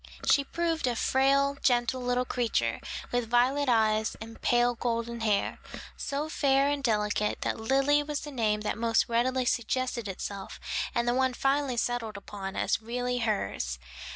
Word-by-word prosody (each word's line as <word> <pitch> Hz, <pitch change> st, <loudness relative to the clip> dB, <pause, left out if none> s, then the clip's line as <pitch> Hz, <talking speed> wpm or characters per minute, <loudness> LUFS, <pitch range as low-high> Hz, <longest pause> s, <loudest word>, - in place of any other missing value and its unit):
She 280 Hz, -, +5 dB
proved 330 Hz, -1 st, -1 dB
a 245 Hz, -, 0 dB
frail, 275 Hz, +3 st, +2 dB
gentle 245 Hz, 0 st, +2 dB
little 250 Hz, 0 st, 0 dB
creature, 220 Hz, -, 0 dB, 0.3 s
with 245 Hz, -2 st, -1 dB
violet 260 Hz, +4 st, +3 dB
eyes 220 Hz, -2 st, +2 dB
and 225 Hz, +1 st, -10 dB
pale 240 Hz, 0 st, +3 dB
golden 235 Hz, 0 st, -2 dB
hair, 210 Hz, -3 st, 0 dB, 0.4 s
so 285 Hz, +2 st, -3 dB
fair 275 Hz, -2 st, +2 dB
and 285 Hz, -1 st, -2 dB
delicate 210 Hz, -2 st, 0 dB
that -, -, -2 dB
Lily 275 Hz, +5 st, +3 dB
was 295 Hz, 0 st, -3 dB
the 295 Hz, -, -7 dB
name 215 Hz, -5 st, 0 dB
that 210 Hz, +1 st, -2 dB
most 230 Hz, -1 st, +2 dB
readily 250 Hz, +2 st, +1 dB
suggested 245 Hz, -1 st, -1 dB
itself 195 Hz, 0 st, -6 dB, 0.4 s
and 235 Hz, 0 st, +1 dB
the 240 Hz, -, +3 dB
one 260 Hz, 0 st, +1 dB
finally 275 Hz, -1 st, +1 dB
settled 230 Hz, -3 st, -1 dB
upon 195 Hz, -1 st, -7 dB
as -, -, 0 dB
really 245 Hz, +2 st, -2 dB
hers. 205 Hz, -, -1 dB
245 Hz, 155 wpm, -29 LUFS, 225-270 Hz, 0.4 s, She